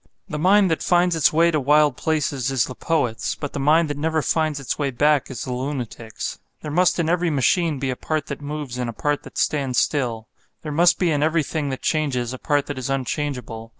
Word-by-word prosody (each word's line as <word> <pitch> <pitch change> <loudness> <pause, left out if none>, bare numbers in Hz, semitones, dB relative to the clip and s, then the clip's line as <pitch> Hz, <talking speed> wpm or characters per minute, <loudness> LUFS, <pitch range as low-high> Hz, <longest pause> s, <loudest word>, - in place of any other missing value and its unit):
The 150 - -4
mind 190 +2 +4
that 160 - 0
finds 175 -1 +3
its 160 - +4
way 170 +2 +4
to 155 - +1
wild 145 0 +4
places 140 -4 -1
is 130 -3 +1
the 130 - -7
poet's; 125 -7 -1
but 145 - -6
the - - -3
mind 155 +4 +4
that 145 -1 -4
never 160 0 0
finds 155 -3 0
its 140 - -4
way 140 -2 0
back 145 +3 +2
is 130 -4 -5
the 125 - -4
lunatic's. 125 -4 -5 0.2
There 150 - -4
must 180 +4 +3
in 170 -2 0
every 175 +1 +1
machine 155 +2 +1
be 135 0 -2
a - - -3
part 155 +2 -2
that 140 0 -6
moves 145 -4 -5
and 125 -1 -2
a - - -5
part 145 +4 -1
that - - -12
stands 135 -4 0
still; 120 -6 0 0.4
there 155 - -4
must 170 +4 +4
be 175 -3 +1
in 145 -2 +1
everything 155 -1 0
that 130 - -5
changes 130 -6 0
a 130 - -7
part 145 -2 +1
that 145 -2 -5
is 130 - -4
unchangeable. 130 -4 -3
145 Hz, 225 wpm, -22 LUFS, 130-160 Hz, 0.4 s, mind